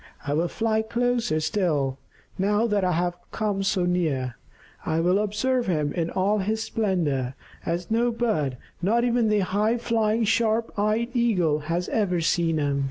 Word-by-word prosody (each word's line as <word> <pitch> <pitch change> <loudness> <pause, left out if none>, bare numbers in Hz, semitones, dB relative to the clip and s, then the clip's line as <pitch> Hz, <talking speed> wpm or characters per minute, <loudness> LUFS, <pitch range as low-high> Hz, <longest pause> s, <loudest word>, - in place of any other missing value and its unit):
I 145 - -1
will 165 +4 +1
fly 220 +4 0
closer 235 -7 0
still, 155 -5 0 0.4
now 205 +3 +1
that 210 -4 +1
I 180 -1 +2
have 175 +1 0 0.2
come 210 -3 -1
so 195 -2 +1
near. 155 -8 0 0.5
I 160 +1 0
will 180 +4 +3
observe 235 +4 0
him 150 -5 0
in 170 -2 -1
all 200 +4 +1
his 220 +3 -1
splendor, 155 - -1 0.3
as 170 +4 -2
no 235 +2 +3
other 235 -1 -2
bird, 155 - 0 0.2
not 225 +6 +2
even 240 -2 +2
the 210 -1 +3
high 210 +5 +1
flying, 230 -1 +1
sharp 225 +1 +1
eyed 215 +3 +1
Eagle, 180 -11 +2
has 175 +2 0
ever 190 -6 +1
seen 165 0 +1
him." 145 -2 0
195 Hz, 165 wpm, -25 LUFS, 165-220 Hz, 0.5 s, will